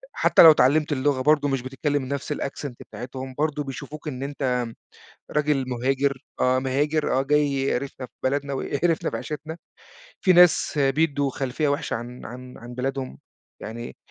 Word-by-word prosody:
حتى - - +5
لو 160 - +11
اتعلِّمت 150 +3 +3
اللغة 135 -1 +1
برضه 150 0 +3
مش 135 -3 0
بتتكلم 135 +1 -2
بنفس 140 +1 -2
الAccent 140 -1 -5 0.2
بتاعتهم، 130 +4 -7
برضه 150 -1 0
بيشوفوك 140 +3 -8
إن 135 -2 -4
أنت 130 -4 -1 0.6
راجل 150 -3 +1
مُهاجر، 130 +2 0 0.2
آه 130 0 +3
مهاجر، 145 +4 0
آه 135 - +1
جاي 145 0 +2
يقرفنا 135 -1 -2
في - - -40
بلدنا 140 +1 0
ويقرفنا 160 +5 0
في - - -2
عيشتنا، 155 +2 -6 0.6
في 185 - +5
ناس 175 -3 +5
بيدّوا 140 0 +2
خلفية 135 +3 -1
وحشة 145 +1 -1
عن 120 +2 -7
عن 125 +1 -10
عن 120 +1 -10
بلادهم 130 - -3 0.4
يعني 115 +2 -7
140 Hz, 155 wpm, -24 LUFS, 130-150 Hz, 0.6 s, لو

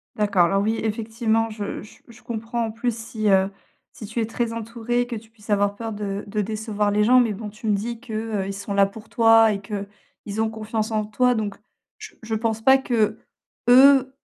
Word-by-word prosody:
D'accord. 205 -4 +3
Alors 195 +3 +1
oui, 220 +2 0
effectivement, 225 +1 0
je 210 -2 -5
j 210 - -15
je 235 0 -16
comprends 230 0 -3
en 220 - -4
plus 230 +1 -2
si, 225 -2 -2
heu, 190 0 +4 0.4
si 215 - -9
tu 220 +3 -4
es 225 - +1
très 230 +1 -2
entouré, 230 +2 -2
que 240 - -4
tu 220 0 -10
puisses 220 -1 -20
avoir 205 0 +2
peur 225 0 -5
de 205 -1 -4
de 210 +1 -1
décevoir 210 0 -1
les 210 +1 +2
gens 250 +4 +6
mais 235 -4 +2
bon 210 +1 -6
tu 215 +2 -8
me 210 - +3
dis 230 +3 -4
que, 250 -3 -10
heu, 215 -3 -2
ils 195 - -4
sont 200 +1 -5
là 200 0 +5
pour 210 +2 -10
toi 225 -1 +5
et 200 - -5
qu'ils 205 +1 -7
ont 220 - +1
confiance 220 0 -3
en 215 -1 0
toi 250 +4 +2
donc 210 -3 -2 0.4
je 435 0 -11
je 220 -1 -3
pense 220 0 -1
pas 265 +4 +6
que, 225 -5 0 0.5
eux 265 +1 +7
220 Hz, 220 wpm, -23 LUFS, 210-230 Hz, 0.5 s, eux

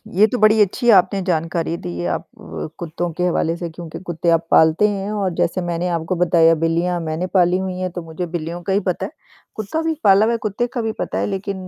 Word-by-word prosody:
ये 210 +3 +6
तो 250 - -2
बड़ी 215 0 +5
अच्छी 235 +5 +1
आपने 195 +2 +2
जानकारी 165 0 -1
दी 85 - -5
आप 85 - -1
अ, - - -9
कुत्तों 170 +1 -3
के 180 - -3
हवाले 165 -1 0
से 170 -1 -5
क्योंकि 165 0 -9
कुत्ते 170 0 -1
आप 165 0 +2
पालते 160 +6 +5
हैं 200 0 -3
और 195 -4 -1
जैसे 185 +2 0
मैंने 175 0 -2
आपको 165 +3 -2
बताया 165 -1 +4
बिल्लियाँ 170 +2 +1
मैंने 160 +3 -3
पाली 180 -1 +4
हुई 190 -1 -3
है 185 0 -2
तो 175 - -3
मुझे 165 +2 -5
बिल्लियों 170 0 -5
का 190 +2 -1
ही 200 - +3
पता 180 - -1
है। - - -7 0.4
कुत्ता 215 +10 -3
भी 325 0 0
पाला 200 +2 +6
हुआ 230 - +1
है, - - 0
कुत्ते 220 +3 -2
का 240 - -1
भी 225 - -1
पता - - -3
है - - 0
लेकिन 195 -1 -4
180 Hz, 235 wpm, -20 LUFS, 165-200 Hz, 0.4 s, ये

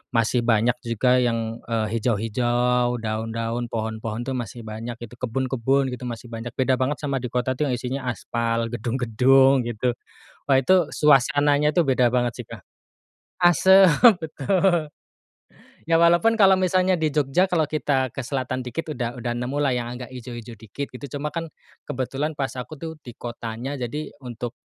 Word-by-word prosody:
masih 115 +2 +2
banyak 115 0 +3
juga 125 +1 +2
yang, 115 -2 -1
eee, 110 -2 0
hijau-hijau, 120 +2 +1
daun-daun, 115 +2 -3
pohon-pohon, 110 0 -4
tuh, - - -1
masih 120 -1 -6
banyak 110 +2 -6
gitu, 120 +1 -10
kebun-kebun 130 +2 0
gitu 125 0 -7
masih 120 0 -7
banyak. 115 +1 -6
Beda 130 0 +2
banget 130 +3 0
sama 140 -2 -1
di 125 - -4
kota, 125 +1 0
tuh, 150 +3 -1
yang - - +1
isinya 130 +2 -4
aspal, 115 0 -2
gedung-gedung, 130 +2 +3
gitu. 120 +2 -1 0.6
Wah, 135 -2 +5
itu 135 +8 +4 0.2
suasananya 145 +1 +3
tuh 175 - +4
beda 130 -2 +3
banget, 120 -2 -1
sih, - - -26
Kak. - - -10 0.8
Asep, 190 +3 +6 0.4
betul. 165 +1 +1 1.0
Ya, 165 - +3
walaupun 175 +7 +4
kalau 195 -2 +7
misalnya 185 0 +2
di 160 - +2
Jogja, 150 +5 +2
kalau 165 -3 +3
kita 140 -4 0
ke - - -5
selatan 130 0 -3
dikit 160 +5 -4
udah 120 -1 -3
udah 120 0 -3
nemulah 135 +3 -1
yang 120 -1 -3
agak 125 0 -7
hijau-hijau 120 -2 -8
dikit 110 +6 -6
gitu. 135 +2 -8
Cuma, 150 +1 -3
kan, 165 0 -3 0.4
kebetulan 135 +4 -2
pas 135 -2 -2
aku, 140 +5 -7
tuh, 165 +1 -5
di 120 - -9
kotanya, 120 +3 -5
jadi 140 +4 -5
untuk, 120 0 -6
125 Hz, 160 wpm, -23 LUFS, 120-145 Hz, 1.0 s, kalau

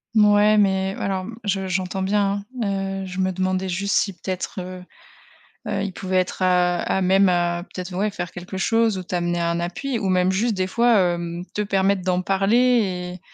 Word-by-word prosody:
Mouais 210 0 +5
mais 190 -1 +2
heu, - - -7
alors, 190 -1 -2 0.2
je 195 -2 -1
j'entends 185 +1 -2
bien, 200 +1 +1 0.2
hein. - - +1 0.4
Heu, - - -5
je 185 0 -6
me 190 0 +1
demandais 185 0 -1
juste 195 +3 -1
si, 200 - +1
peut-être, 185 +1 -5
heu 185 0 -7 0.9
heu, - - -1
ils 200 - -4
pouvaient 185 +1 -3
être 185 +1 -2
à 180 -1 +3
à 190 - 0
même, 190 +1 +4
heu, 175 -1 +1
peut-être, 180 0 -8
ouais, 210 +3 0
faire 175 -3 -6
quelque 180 +2 -8
chose 225 0 +2
ou 185 - -6
t'amener 175 -1 -1
un 170 0 0
appui 225 +9 -3
ou 195 - -1
même 185 0 +2
juste 220 +4 +1
des 185 -1 -1
fois, 235 +3 +3 0.2
heu, 170 0 -5
te 210 - 0
permettre 195 -1 +1
d'en 180 0 0
parler 195 -3 +1
190 Hz, 195 wpm, -22 LUFS, 180-200 Hz, 0.9 s, Mouais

